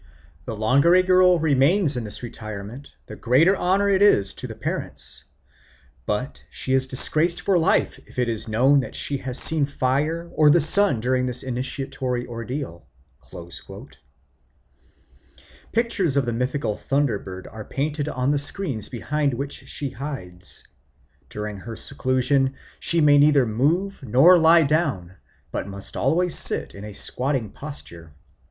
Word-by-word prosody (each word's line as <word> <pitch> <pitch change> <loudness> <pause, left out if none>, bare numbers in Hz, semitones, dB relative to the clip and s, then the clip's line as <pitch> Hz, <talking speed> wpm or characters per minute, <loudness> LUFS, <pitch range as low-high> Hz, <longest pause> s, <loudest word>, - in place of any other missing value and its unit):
The 110 - -4
longer 135 +11 +4
a 185 - +5
girl 185 -1 +5
remains 150 +2 +3
in 120 -2 -3
this 105 +3 -5
retirement 110 +2 -8
the - - -9
greater 150 +11 +3
honour 190 +2 +1
is 195 - +4
it - - -8
to - - -5
the - - -8
parents; - - -4 0.8
but 115 +6 -3
she 130 - -3
is 130 0 +2
disgraced 160 +6 0
for 195 - +1
life 165 -2 +2
if - - -18
it 125 -1 +1
is 115 -2 -3
known 130 +6 +4
that 130 - -5
she 140 - -3
has 130 -1 -4
seen 155 -3 +2
fire 145 +5 -1
or 155 -1 +5
the 170 - +6
sun 165 - +3
during 125 +1 +1
this 125 0 -2
initiatory 130 0 -3
ordeal." 115 - -6 2.8
Pictures 215 - +1
of 140 - +2
the 120 - -2
mythical 125 -1 -1
thunder 135 -5 0
bird 95 -1 -9
are 110 0 -8
painted 145 +4 -3
on 130 0 0
the 145 - +1
screens 140 - -2
behind 140 +2 -1
which 140 +3 -6
she 140 -3 -4
hides. 90 -11 -7 0.7
During 105 -1 -5
her 115 +4 -8
seclusion 135 +1 0 0.2
she 170 -1 +1
may 145 -1 +6
neither 145 -2 +5
move 160 - 0
nor 135 +9 +6
lie 165 +1 +6
down, 140 - -1 0.3
but - - -4
must 100 0 -8
always 180 +1 +1
sit - - 0
in 100 - -10
a 105 - -8
squatting 125 0 -2
posture. 85 - -9
135 Hz, 150 wpm, -23 LUFS, 120-155 Hz, 2.8 s, the